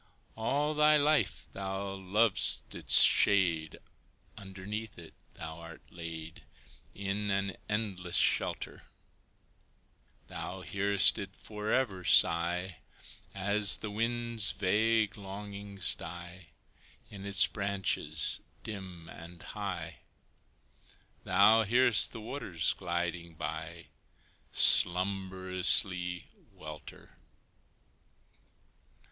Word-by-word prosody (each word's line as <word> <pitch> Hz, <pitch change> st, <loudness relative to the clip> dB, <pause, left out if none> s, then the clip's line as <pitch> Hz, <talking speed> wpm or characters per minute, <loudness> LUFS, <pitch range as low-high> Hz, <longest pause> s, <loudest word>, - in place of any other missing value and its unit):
All 145 Hz, +7 st, -1 dB
thy 150 Hz, 0 st, +4 dB
life 150 Hz, +1 st, 0 dB
thou 95 Hz, 0 st, -5 dB
lov'dst 95 Hz, +3 st, +1 dB
its -, -, +8 dB
shade: 85 Hz, -6 st, +2 dB, 0.6 s
Underneath 100 Hz, +3 st, -8 dB
it 80 Hz, -2 st, -13 dB, 0.2 s
thou 80 Hz, 0 st, -8 dB
art 80 Hz, -1 st, -13 dB
laid, 80 Hz, -1 st, -9 dB, 0.5 s
In 100 Hz, +1 st, -4 dB
an 100 Hz, -2 st, -2 dB
endless 100 Hz, -5 st, -3 dB
shelter; -, -, 0 dB, 1.4 s
Thou 95 Hz, +1 st, -7 dB
hearest 100 Hz, +1 st, +2 dB
it 95 Hz, -1 st, -8 dB
forever 105 Hz, -2 st, -3 dB
sigh 85 Hz, +2 st, +3 dB, 0.6 s
As 100 Hz, -1 st, +4 dB
the 105 Hz, -, -7 dB
wind's 115 Hz, 0 st, +1 dB
vague 110 Hz, +3 st, 0 dB
longings 100 Hz, -1 st, -2 dB
die 90 Hz, +1 st, -10 dB, 0.6 s
In 100 Hz, -1 st, -10 dB
its 100 Hz, -1 st, +3 dB
branches 95 Hz, -6 st, -1 dB, 0.2 s
dim 95 Hz, -6 st, -9 dB
and 85 Hz, +1 st, -12 dB
high 90 Hz, -6 st, -6 dB, 1.3 s
Thou 100 Hz, +4 st, +4 dB
hear'st 120 Hz, -2 st, +3 dB
the 115 Hz, -, -9 dB
waters 105 Hz, -, -2 dB
gliding 85 Hz, -2 st, -5 dB
by -, -, -7 dB, 0.7 s
Slumberously 95 Hz, -1 st, +2 dB, 0.3 s
welter. 75 Hz, -1 st, -12 dB
95 Hz, 85 wpm, -30 LUFS, 90-105 Hz, 1.4 s, its